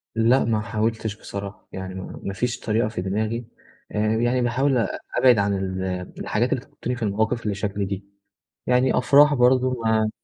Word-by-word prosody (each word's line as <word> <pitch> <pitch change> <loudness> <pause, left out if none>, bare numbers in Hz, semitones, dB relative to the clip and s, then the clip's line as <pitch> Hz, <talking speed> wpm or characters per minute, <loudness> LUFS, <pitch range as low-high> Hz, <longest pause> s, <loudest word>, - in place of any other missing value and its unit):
لأ 115 +3 +4
ما 110 -2 +1
حاولتش 110 0 -2
بصراحة، 100 0 -7
يعني 95 0 -6
ما 95 - -7
ما 100 - -3
فيش 120 +4 -2
طريقة 110 0 0
في 110 -5 -4
دماغي، 110 +5 -2 0.5
آآ - - -5 0.2
يعني 120 +2 +1
باحاول 130 +3 +2
أ 115 - +2 0.3
أبعد 125 -4 +6
عن 100 0 +2
ال 95 -1 -2 0.4
الحاجات - - 0
اللي - - -2
تحطّني 125 +1 -5
في 120 - -5
المواقف 110 +3 0
اللي 105 -2 -1
شكل 100 0 -2
دي، 100 0 -5 0.6
يعني 125 +1 +3
أفراح 145 +3 +6
برضه 130 0 +4
ما 110 -1 +2
110 Hz, 175 wpm, -23 LUFS, 100-125 Hz, 0.6 s, أبعد